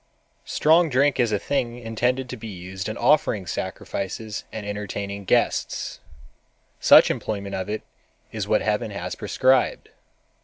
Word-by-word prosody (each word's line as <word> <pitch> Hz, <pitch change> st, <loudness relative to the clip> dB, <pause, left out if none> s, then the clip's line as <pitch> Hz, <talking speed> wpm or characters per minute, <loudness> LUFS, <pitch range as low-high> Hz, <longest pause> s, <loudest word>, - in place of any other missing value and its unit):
_ -, -, -16 dB
"Strong 165 Hz, +2 st, +4 dB
drink 140 Hz, +1 st, +2 dB
is 120 Hz, -3 st, +3 dB
a 105 Hz, -, +2 dB
thing 120 Hz, +1 st, -2 dB
intended 125 Hz, +3 st, -1 dB
to 125 Hz, -, -6 dB
be 115 Hz, -1 st, -8 dB
used 95 Hz, 0 st, -6 dB
in 110 Hz, -, -5 dB
offering 110 Hz, -10 st, +2 dB
sacrifices 100 Hz, +4 st, -4 dB
and 110 Hz, -2 st, -6 dB
entertaining 100 Hz, -1 st, -5 dB
guests,—such 65 Hz, -, +1 dB
employment 100 Hz, -2 st, -4 dB
of 95 Hz, +2 st, -3 dB
it 105 Hz, +1 st, -3 dB, 0.5 s
is -, -, -4 dB
what -, -, +2 dB
Heaven -, -, 0 dB
has -, -, -5 dB
prescribed. 130 Hz, 0 st, +1 dB
110 Hz, 140 wpm, -24 LUFS, 100-125 Hz, 0.5 s, Strong